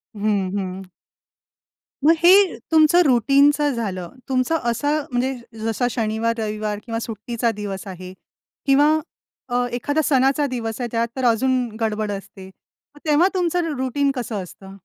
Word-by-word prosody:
हं, 200 -2 0
हं. 190 0 -4 1.2
मग 325 - +7
हे 380 +2 +6
तुमचं 320 +2 +5
रुटीनचं 280 +4 +4
झालं. 185 -7 -4 0.2
तुमचा 255 +5 +1
असं 290 +6 0
म्हणजे 255 +2 0 0.3
जसा 225 +2 -1
शनिवार-रविवार 215 -2 -2
किंवा 230 -1 -3
सुट्टीचा 230 +1 -2
दिवस 195 -1 -5
आहे 185 0 -8 0.5
किंवा 285 +2 +5 0.6
अ, 245 0 +1
एखादा 290 +6 0
सणाचा 275 +1 +2
दिवस 235 -2 -4
आहे 240 - -1
त्यात 230 0 0
तर 260 -1 -2
अजून 240 +3 +3 0.3
गडबड 215 -1 -1
असते. 195 -1 -8 0.5
मग - - -15
तेव्हा 305 +5 +4
तुमचं 345 -3 0
रुटीन 275 +2 0
कसं 220 -6 -3
असतं? 195 +2 -13
240 Hz, 135 wpm, -21 LUFS, 215-285 Hz, 1.2 s, मग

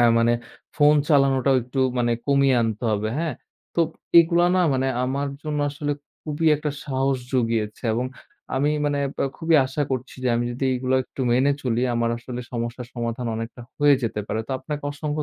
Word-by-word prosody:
এ - - +6
মানে 115 +1 +4 0.4
ফোন 150 0 +6
চালানোটাও 135 -2 +4
একটু 125 +3 -6 0.2
মানে 120 -1 +2
কমিয়ে 140 -1 +4
আনতে 115 +1 -2
হবে। 105 +1 -1
হ্যাঁ? 165 -5 -1 0.4
তো 170 - +2 0.4
এগুলা 170 +1 +5
না - - +4
মানে 130 +1 +1 0.2
আমার 140 +2 -1
জন্য 150 -1 -2
আসলে 145 0 -2 0.3
খুবই 155 +1 -2
একটা 150 0 -3
সাহস 135 -1 0 0.2
জুগিয়েছে 115 -3 0
এবং 125 +2 -1 0.5
আমি 145 +2 +2 0.2
মানে 145 -1 0 0.2
ব - - -32 0.2
খুবই 165 0 +1
আশা 135 +3 -2
করছি। 130 -1 -3
যে - - +3
আমি 120 - 0
যদি 125 +3 -3
এগুলো 130 +1 0
একটু 135 - -10
মেনে 130 +3 +3
চলি, 120 -2 0
আমার 115 0 +1
আসলে 125 +1 -6
সমস্যার 120 +1 -4
সমাধান 120 0 -3
অনেকটা 115 +2 -6 0.2
হয়ে 145 -1 +6
যেতে 110 -2 -1
পারে। 110 +1 -2
তো - - -6
আপনাকে 150 -1 -5
অসংখ্য 150 +1 -3
130 Hz, 180 wpm, -24 LUFS, 120-145 Hz, 0.5 s, এ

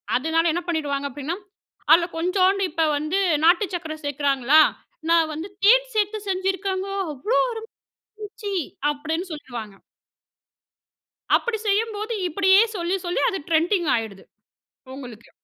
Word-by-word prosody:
அதுனால 320 +5 +1
என்ன 350 - -1
பண்ணிருவாங்க 285 -4 -1
அப்டீன்னா, 290 +5 -4 0.6
அதுல 340 +1 +7
கொஞ்சோண்டு 370 +3 +2
இப்ப 325 +1 0
வந்து 310 +6 -1 0.3
நாட்டு 360 +5 +5
சக்கரை 320 -3 -4
சேர்க்கிறாங்களா, 285 0 +3 0.5
நான் 330 -1 +4
வந்து 320 +6 -6 0.2
தேன் - - +5
சேர்த்து 425 0 +1
செஞ்சிருக்காங்க 380 0 -1 0.2
அவ்வளோ 300 - -1 0.7
அருமையா - - -
இருந்துச்சு, 420 -1 -6 0.4
அப்படின்னு 320 +5 -3
சொல்லுவாங்க. 240 -8 -8 1.6
அப்படி 475 -2 0
செய்யும்போது 430 +2 0 0.2
இப்படியே 380 +3 +5
சொல்லி 350 0 -1
சொல்லி 350 - -1
அது 390 - -3
ட்ரெண்டிங் 340 +2 +2
ஆயிடுது, 220 -4 -5 0.7
உங்களுக்கு. 245 -5 -11
340 Hz, 115 wpm, -23 LUFS, 295-395 Hz, 1.6 s, அதுல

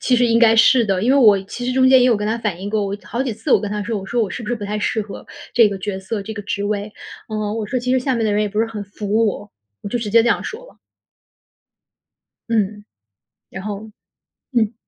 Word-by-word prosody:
其 250 - +2
实 245 - +3
应 230 0 +3
该 225 -1 +5
是 235 +1 +6
的。 195 -2 0
因 245 - +2
为 - - +4
我 210 -6 +6
其 245 +5 -7
实 250 - -1
中 260 0 +4
间 260 0 +7
也 250 - +5
有 235 -4 +4
跟 210 - -3
他 220 +2 0
反 205 -6 -3
映 200 - -4
过， 210 -1 0
我 200 +1 -3
好 245 +3 -2
几 255 - -2
次 220 +1 -2
我 - - +5
跟 210 - -4
他 210 0 -2
说， 210 0 -2
我 195 - -8
说： 235 +2 0
“我 200 - -2
是 235 - -6
不 210 - -7
是 240 - 0
不 205 - -7
太 210 +1 -3
适 220 - -1
合 200 - -10 0.3
这 230 -3 +6
个 200 -1 -5
角 190 0 -4
色、 200 +2 -4
这 220 - -6
个 205 - -6
职 200 0 -3
位？” 205 0 -3 0.4
嗯， 215 0 -3
我 215 -2 -3
说： 255 - -1
“其 250 +1 -1
实 260 - +3
下 260 0 -1
面 230 -1 0
的 210 - +1
人 210 +1 +2
也 210 - -1
不 210 +2 -1
是 225 - +1
很 220 -2 -6
服 210 +2 -1
我。” 205 0 -4 0.3
我 - - -5
就 240 +4 -2
直 215 -3 -4
接 230 +1 +6
这 240 - +1
样 - - +1
说 475 +3 -7
了。 - - -19 1.7
嗯， 210 -2 -1 0.7
然 190 +1 -8
后 210 +1 -6 0.6
嗯。 225 -2 +1
215 Hz, 295 characters per minute, -20 LUFS, 205-235 Hz, 1.7 s, 间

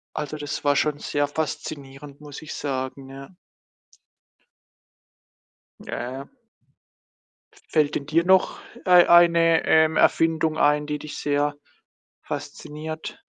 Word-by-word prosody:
Also, 150 0 -4
das 145 -1 -6
war 145 0 +3
schon 150 0 0
sehr 145 -1 -1
faszinierend, 145 -2 -6
muss 145 0 -10
ich 155 - -8
sagen, 135 -1 -5
ja. 135 0 -11 2.5
Ja, - - -7
ja, 120 - -5
ja. 135 +1 -7 1.5
Fällt 150 -2 +1
denn 140 - -4
dir 165 +3 +1
noch 190 +1 +3 0.3
ei 180 -1 +6
eine, 170 -1 +5
ähm, 160 0 +4
Erfindung 160 -1 +2
ein, 150 -1 +2
die 150 0 -3
dich 150 0 -8
sehr 145 0 0 0.7
fasziniert? 150 +2 -7
150 Hz, 115 wpm, -23 LUFS, 145-160 Hz, 2.5 s, ei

